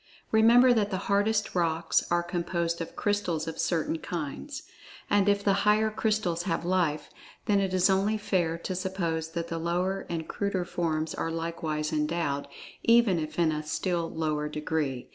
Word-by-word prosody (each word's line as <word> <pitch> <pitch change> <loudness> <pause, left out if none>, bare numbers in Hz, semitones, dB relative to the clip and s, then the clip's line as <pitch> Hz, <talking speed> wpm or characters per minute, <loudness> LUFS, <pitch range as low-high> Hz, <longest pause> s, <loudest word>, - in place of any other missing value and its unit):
Remember, 235 +3 +6
that 210 -3 +1
the 190 - -2
hardest 205 +1 +1
rocks 165 -2 +1
are 175 0 +2
composed 170 -1 -2
of 165 - -6
crystals 195 -7 -1
of 160 - -5
certain 165 -1 0
kinds. 175 - -5 0.5
And, 205 0 +4
if 200 0 +2
the 200 - +3
higher 215 +1 +3
crystals 210 -6 0
have 165 0 -1
Life, 175 -4 0 0.3
then 205 -2 +3
it 195 -1 0
is 185 -1 +3
only 200 +3 +2
fair 175 -5 0
to 170 - -4
suppose 170 -4 -2
that 170 0 -3
the 165 - -3
lower 180 +3 -1
and 165 -2 -3
cruder 200 -3 -2
forms 160 -2 -2
are 165 - -2
likewise 165 -2 -3
endowed, 150 -2 -1 0.3
even 230 -6 +4
if 155 0 -5
in 165 -2 +3
a 150 0 -2
still 170 +2 -2
lower 155 -2 -2
degree. 150 -4 -2
170 Hz, 165 wpm, -28 LUFS, 160-200 Hz, 0.5 s, Remember